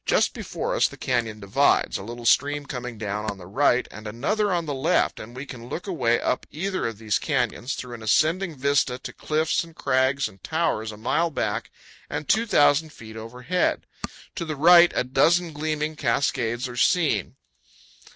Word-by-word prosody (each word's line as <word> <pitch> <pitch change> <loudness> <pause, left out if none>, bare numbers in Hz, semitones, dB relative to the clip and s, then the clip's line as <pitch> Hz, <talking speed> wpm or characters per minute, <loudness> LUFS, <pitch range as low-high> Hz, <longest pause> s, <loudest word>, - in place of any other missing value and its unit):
Just - - +3
before - - -4
us - - +4
the - - -12
canyon 115 -4 -1
divides, 105 +7 +2
a - - -7
little 120 +2 -8
stream 145 +4 +3
coming 125 -4 -6
down 105 0 -3
on 100 - -5
the 90 - -11
right 120 +6 +2
and 110 0 -9
another 200 - 0
on 170 -2 0
the 145 - -3
left, 145 +7 +1
and 115 +3 -10
we 130 +2 -6
can 120 -3 -10
look 175 - -5
away 130 - +1
up - - -1
either 185 -1 -2
of 115 -3 -6
these 110 -1 0
canyons, 125 -2 -1
through 125 -1 -7
an 115 - -8
ascending 160 - +2
vista, 135 -2 +1
to 130 - -8
cliffs 155 +2 0
and 165 -1 -14
crags 130 +1 +1
and 95 -1 -16
towers 160 -10 -1
a 105 - -10
mile 165 +10 +1
back 160 - -2 0.4
and 145 - -4
2,000 160 -8 +3
feet 110 -5 -12
overhead. 125 +10 -2 0.5
To 170 - -2
the 155 -2 -4
right 170 +4 +7
a - - +2
dozen 165 +6 +2
gleaming 155 +1 -2
cascades 125 -2 0
are 120 -1 -8
seen. 160 -1 +2
135 Hz, 180 wpm, -24 LUFS, 115-160 Hz, 0.5 s, right